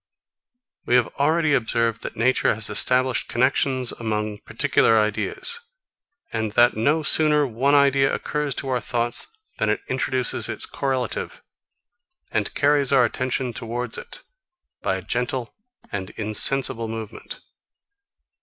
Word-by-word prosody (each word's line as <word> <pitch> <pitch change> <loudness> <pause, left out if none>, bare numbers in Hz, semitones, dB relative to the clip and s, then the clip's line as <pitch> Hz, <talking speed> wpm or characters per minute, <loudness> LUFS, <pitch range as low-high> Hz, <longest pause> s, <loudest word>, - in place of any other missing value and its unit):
41. - - -32
We 125 - +3
have 125 -2 +2
already 155 +1 +2
observed 115 -3 0
that - - -6
nature 125 0 +2
has 110 +1 -3
established 130 -1 +2
connexions 130 0 +1
among 105 -2 -3
particular 115 - +2
ideas, 110 - -1 0.7
and 110 -2 -2
that 120 +1 +4
no 145 +8 +1
sooner 150 -1 +5
one 135 +4 +1
idea 140 -1 +4
occurs 150 -3 -2
to 135 - -3
our 125 -1 +1
thoughts 120 -1 -2 0.3
than - - +1
it - - 0
introduces 130 -1 0
its - - -2
correlative, 130 -4 -3 0.9
and - - -1
carries 145 -1 +2
our 130 -3 +5
attention 130 0 -2
towards 120 +1 -3
it, - - -6 0.6
by 95 - 0
a 95 - -6
gentle 125 +3 -2 0.4
and 95 -2 -4
insensible 115 +2 +2
movement. 110 -1 -7
125 Hz, 130 wpm, -23 LUFS, 115-135 Hz, 0.9 s, sooner